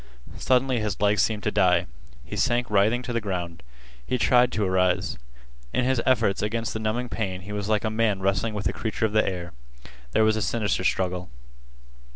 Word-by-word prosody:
Suddenly 130 -1 +2
his 105 -2 -3
legs 105 0 +3
seemed 110 -2 0
to 105 - 0
die. 90 -4 +3 0.4
He - - -7
sank 120 -1 0
writhing 110 +5 +3
to 125 - -4
the 115 - 0
ground. 90 -5 -4 0.4
He 125 - -1
tried 125 0 +4
to 110 - 0
arise. 90 -5 +1 0.5
In 125 - +1
his 130 -2 +1
efforts 125 -6 +2
against 115 +2 -2
the 110 - -3
numbing 110 +3 -1
pain 95 -6 -3
he 100 +3 -9
was 105 0 -3
like 105 -1 +1
a 110 - 0
man 110 -3 +1
wrestling 100 +3 0
with 100 - -4
a - - +1
creature 110 0 -2
of 105 - -2
the 110 - +4
air. 90 -2 -4 0.6
There - - +4
was 110 0 +3
a - - -2
sinister 105 -4 0
struggle. 90 -1 -1
105 Hz, 195 wpm, -25 LUFS, 95-115 Hz, 0.6 s, tried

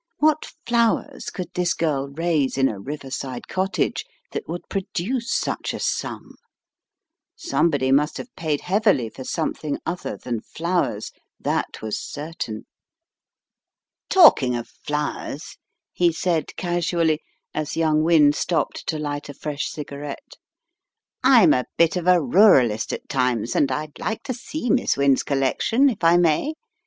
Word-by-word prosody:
What 310 0 +1
flowers 235 -1 +1
could 180 - -6
this 180 -1 0
girl 140 -4 0
raise 150 -2 0
in 135 0 +4
a 105 - -4
riverside 135 0 -6
cottage 190 +2 -1 0.3
that 440 - -5
would 175 - -5
produce 220 +6 -2
such - - -1
a - - -5
sum? - - -3 1.0
Somebody 145 - +1
must 150 +2 +2
have 245 - -9
paid 155 -3 -1
heavily 195 - +2
for 130 - -9
something 155 0 -2
other 180 - -4
than 120 -3 -4
flowers; 170 - -2 0.3
that - - -2
was 110 -1 -2
certain. 145 -8 -6 1.4
"Talking 225 - +6
of 120 -1 -5
flowers," 150 0 -4 0.4
he 175 -1 +3
said, 165 0 -1
casually, 170 -3 0 0.3
as 155 0 -3
young 155 -2 +3
Wynne 155 -3 +5
stopped 170 +2 -1
to 155 - -1
light 145 -1 -4
a 145 - -8
fresh 145 0 -3
cigarette. 145 -1 -7 0.9
"I'm - - +7
a 125 - 0
bit 170 +1 +4
of 180 -1 -2
a 180 -1 +6
ruralist 140 - +4
at - - -6
times, 125 -4 0
and 140 - +2
I'd 150 0 -4
like 220 - -3
to 270 -2 -3
see 250 +2 -3
Miss 260 - +2
Wynne's 140 -1 +3
collection 145 - +2
if 220 -8 -5
I 165 +1 +6
may. 175 - +2
155 Hz, 140 wpm, -23 LUFS, 140-180 Hz, 1.4 s, I'm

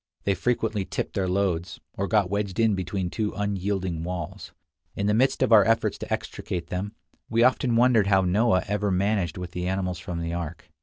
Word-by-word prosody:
They 100 - +2
frequently 110 +1 0
tipped - - -4
their 95 -1 0
loads, 90 -2 -1 0.2
or 100 - -2
got 105 -3 +3
wedged 100 +1 -2
in 110 -2 +4
between 95 -1 -2
two 105 -2 -2
unyielding 95 -4 -2
walls. 85 -2 -5 0.4
In 100 - -2
the 105 - +2
midst 130 +4 +2
of 130 - +1
our 110 -3 +8
efforts 115 +3 +1
to - - -7
extricate 85 -2 -4
them, 100 +4 -3 0.3
we 115 +1 +3
often 125 -1 +3
wondered 115 -4 +4
how 95 -1 +4
Noah 95 +2 +2
ever 105 0 0
managed 95 -2 0
with 90 -1 -6
the 90 0 -3
animals 90 -2 -2
from 90 -3 -5
the 85 0 -3
ark. 85 -1 -6
100 Hz, 195 wpm, -26 LUFS, 90-105 Hz, 0.4 s, our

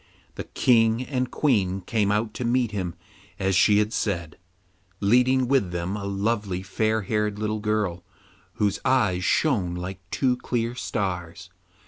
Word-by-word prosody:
The - - -6
King 115 -1 +3
and 130 -2 -2
Queen 100 -10 +1
came 105 0 0
out 105 +1 0
to 125 - -4
meet 120 -1 +1
him 90 -5 -3 0.4
as 95 0 0
she 105 +3 +5
had 105 +1 +1
said, 85 -6 -2 0.6
leading 125 +5 +3
with 130 -8 +2
them 90 +3 -3
a 100 -1 -5
lovely 100 -2 -1
fair 110 +3 0
haired 105 0 -1
little 110 0 -2
girl, 105 -5 -1 0.5
whose 105 0 0
eyes 100 -9 +2
shone 95 - +1
like 90 +1 -5
two 125 +2 +1
clear 120 -1 -2
stars. 90 -7 -4
105 Hz, 145 wpm, -25 LUFS, 95-115 Hz, 0.6 s, she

